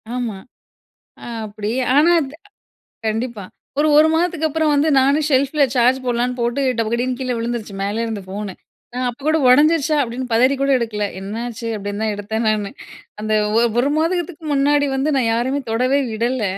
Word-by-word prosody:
ஆமா. 235 -5 -3 0.9
அ - - -8 0.2
அப்டி 210 +1 -5 0.2
ஆனா 320 +4 +5
இந்த 280 +1 -6 0.7
கண்டிப்பா 225 -1 -3 0.4
ஒரு 310 - +3
1 310 +1 +7
மாதத்துக்கு 330 -1 +1
அப்புறம் 315 0 +1
வந்து 295 +2 +2
நானும் 280 +3 +2
செல்ஃபில் 280 +2 +3
சார்ஜ் 250 +2 +4
போடலாம்ன்னு 245 +1 -1
போட்டு 240 +4 0 0.2
"டபக்கடின்னு" 235 +3 -1
கீழே 255 -1 -2
விழுந்துடுச்சு 230 -3 -4
மேலே 215 +3 -1
இருந்து 220 -3 -4
ஃபோன்னு. 200 0 -5 0.4
நான் 250 0 -1
அப்போ 245 +3 -10
கூட 315 +1 +3
"ஓடைஞ்சிர்ச்சா" 305 +3 +4
அப்படின்னு 250 +1 -3
பதறி 255 +4 +4
கூட 275 - +1
எடுக்கல, 215 -3 -2
"என்னாச்சு?" 230 +3 -5
அப்படின்னு 205 +1 -5
தான் 220 - 0
எடுத்தேன் 220 +3 -3
நானு 210 -2 0 0.5
அந்த 215 0 -1 0.5
1 275 +3 +2
மாதத்துக்கு 330 0 -1
முன்னாடி 285 +1 +3
வந்து 275 +3 0
நான் 250 -4 +2
யாரையுமே 260 +5 0
தொடவே 255 +5 +2
விடல. 235 +2 -1
250 Hz, 160 wpm, -19 LUFS, 220-285 Hz, 0.9 s, 1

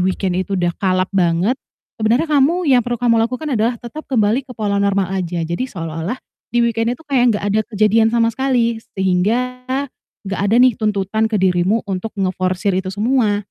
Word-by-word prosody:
weekend 185 0 0
itu 195 +1 -2
udah 175 -1 0
kalap 185 -1 0
banget, 185 +6 +1 0.4
sebenarnya 230 +8 +2
kamu 305 +6 +3
yang 250 - +6
perlu 240 0 -2
kamu 230 -1 +2
lakukan 255 +6 -2
adalah 235 +1 +1
tetap 240 +7 -9
kembali 245 +2 +1
ke 250 - -10
pola 205 -2 0
normal 200 -2 +1
aja, 175 -3 -2
jadi 170 +9 -2
seolah-olah 165 +2 -4 0.4
di 240 0 +3
weekend 230 +1 0
itu 320 - -19
kayak 250 -6 +2
gak - - -7
ada 215 - +3 0.2
kejadian 215 +2 +4
sama 230 0 +2
sekali 235 -3 0 0.2
sehingga 220 +7 0 0.6
gak 195 -1 -3
ada 220 - +3
nih 250 +1 +6
tuntutan 215 +1 0
ke 220 - 0
dirimu 185 +3 +1
untuk 195 +2 -3
ngeforsir 185 +1 -1
itu 190 - -7
semua. 210 0 +1
215 Hz, 180 wpm, -18 LUFS, 190-240 Hz, 0.6 s, yang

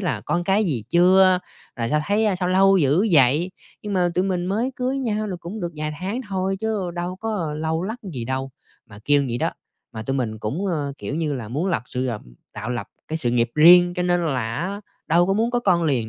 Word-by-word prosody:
là 150 - -1
"Con 175 +8 -1
cái 200 +4 +2
gì 125 - -2
chưa? 185 +1 +5 0.4
Rồi 115 -1 -2
sao 150 - +2
thấy, 210 +2 +2
à, 195 - +1
sao 180 0 -1
lâu 195 +1 +5
dữ 155 +8 +3
vậy?" 150 +5 +4 0.3
Nhưng 205 -1 -4
mà 180 -2 +2
tụi 185 - +2
mình 180 -2 -1
mới 225 +7 -1
cưới 260 +2 -1
nhau 215 -4 -1
là 185 - -4
cũng 200 +5 -7
được 175 -1 -4
vài 155 0 -3
tháng 200 +7 -3
thôi 190 0 -1
chứ 210 -5 -2
đâu 175 +1 -4
có 190 -8 -3
lâu 160 +2 -1
lắc 220 +5 -4 0.2
gì 120 -3 -4
đâu, 130 +1 -3 0.4
mà 105 -1 -13
kêu 145 -1 +4
vậy 120 - -2
đó. - - 0 0.4
Mà 110 - -6
tụi 135 +4 -2
mình 110 -4 -2
cũng, 140 - -3
ờ, 150 -6 -2
kiểu - - -5
như 155 -2 -1
là, 115 -5 -6
muốn 150 +9 -2
lập 170 -9 0
sự 125 +1 -3
gập 115 -4 -3 0.3
tạo 110 +4 -5
lập 120 - -4 0.2
cái 160 - -2
sự 125 -7 0
nghiệp 120 -1 +1
riêng, 175 +3 +7
cho 180 - -1
nên 175 -1 +1
là 120 -6 -1
á, 195 +5 -3 0.3
đâu 175 +2 +4
có 195 - +1
muốn 225 +4 +1
có 245 0 0
con 180 -6 +2
liền 130 -8 0
175 Hz, 245 wpm, -22 LUFS, 135-195 Hz, 0.4 s, riêng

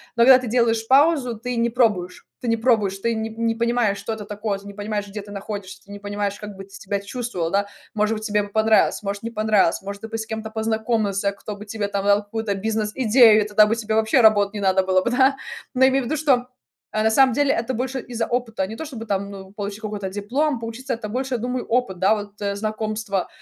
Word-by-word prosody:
Но 235 - +4
когда 260 0 +8
ты 250 - -6
делаешь 225 -1 +1
паузу, 270 -4 +4
ты 245 +1 -4
не 235 0 +2
пробуешь, 210 -7 0 0.2
ты 245 - -5
не 230 - +3
пробуешь, 220 -5 +2
ты 230 +3 0
ни 220 0 -2
не 225 0 -1
понимаешь, 235 -3 +1
что 225 - -4
это 220 -1 -6
такое, 205 0 -3
ты 200 - -17
не 200 - -8
понимаешь, 205 0 -3
где 210 +1 -6
ты 205 0 -12
находишься, 200 -1 -7
ты 200 - -14
не 205 - -8
понимаешь, 205 0 -3
как 210 -1 -8
бы 195 - -9
ты 195 - -17
себя 200 +1 -4
чувствовал, 200 -6 -4
да. 200 +1 +1 0.3
Может 215 +1 +1
быть, 215 - -7
тебе 210 -1 +1
бы 200 - -8
понравилось, 220 0 +3
может, 200 0 -3
не 230 +1 -5
понравилось, 215 -5 +2
может, 200 +1 -7
ты - - -4
бы 225 0 -4
с 220 - -4
кем-то 220 0 -5
познакомился, 220 -3 -1
кто 205 +1 -7
бы 210 - -10
тебе 205 -1 -3
там 200 0 -2
дал 205 +1 +4
какую-то 205 -1 -3
бизнес 215 +1 -2
идею, 230 -3 +6
и - - -6
тогда 210 0 +5
бы 225 - +1
тебе 220 -1 -2
вообще 220 +3 +3
работать 205 -2 +5
не 205 - -4
надо 190 0 +3
было 185 0 +2
бы, 240 - 0
да. 265 +2 +4 0.4
Но 260 +1 +3
я 265 - +7
имею 265 -1 +1
ввиду, 310 - -1
что, 265 -5 +2 0.5
э, 215 - +1
на 220 - +3
самом 260 0 +5
деле 285 +1 +2
это 235 +3 -2
больше 260 +2 -2
из-за 235 -2 -3
опыта. 230 -5 -1
Не 220 - -7
то 320 - -5
чтобы 235 -6 -7
там, 200 0 -1
ну, 190 -1 -10
получить 205 +1 -6
какой-то 205 -3 -4
диплом. 245 +9 -1
Поучиться- 230 +4 -5
это 215 -2 -5
больше, 260 +3 -3
я - - -2
думаю, 250 +1 -3
опыт, 230 -7 0
да, 200 +3 +4
вот, 205 0 -8
э, 200 -1 -1
знакомства, 215 -2 -2
220 Hz, 250 wpm, -22 LUFS, 205-235 Hz, 0.5 s, когда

